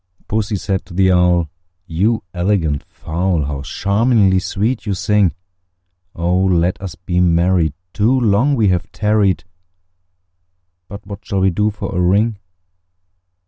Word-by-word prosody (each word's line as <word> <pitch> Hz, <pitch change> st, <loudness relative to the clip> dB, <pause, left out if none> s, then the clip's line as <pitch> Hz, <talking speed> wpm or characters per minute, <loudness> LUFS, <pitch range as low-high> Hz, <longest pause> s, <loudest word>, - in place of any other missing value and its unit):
II. -, -, -33 dB
Pussy 105 Hz, 0 st, -1 dB
said 95 Hz, -1 st, -2 dB
to 90 Hz, -, -11 dB
the 95 Hz, 0 st, +3 dB
Owl, 90 Hz, -2 st, +3 dB, 0.4 s
"You 100 Hz, +7 st, 0 dB
elegant 85 Hz, -6 st, 0 dB
fowl, 85 Hz, 0 st, -2 dB
How 70 Hz, -1 st, -4 dB
charmingly 100 Hz, -, +2 dB
sweet 110 Hz, +6 st, -2 dB
you 100 Hz, -, 0 dB
sing! 100 Hz, -1 st, +2 dB, 0.8 s
Oh! 90 Hz, +2 st, 0 dB
let 90 Hz, -1 st, +1 dB
us 95 Hz, -4 st, -6 dB
be 90 Hz, 0 st, -2 dB
married; 85 Hz, -2 st, +2 dB, 0.2 s
too 115 Hz, +5 st, +2 dB
long 120 Hz, +5 st, +2 dB
we 110 Hz, -5 st, +2 dB
have 90 Hz, +1 st, -1 dB
tarried: 105 Hz, -3 st, +1 dB, 1.4 s
But 100 Hz, +1 st, -10 dB
what 100 Hz, 0 st, -9 dB
shall 100 Hz, -1 st, -2 dB
we 95 Hz, 0 st, +3 dB
do 105 Hz, +5 st, +1 dB
for 100 Hz, -2 st, -6 dB
a 90 Hz, -, +1 dB
ring?" 100 Hz, +4 st, +2 dB
95 Hz, 140 wpm, -18 LUFS, 90-105 Hz, 1.4 s, the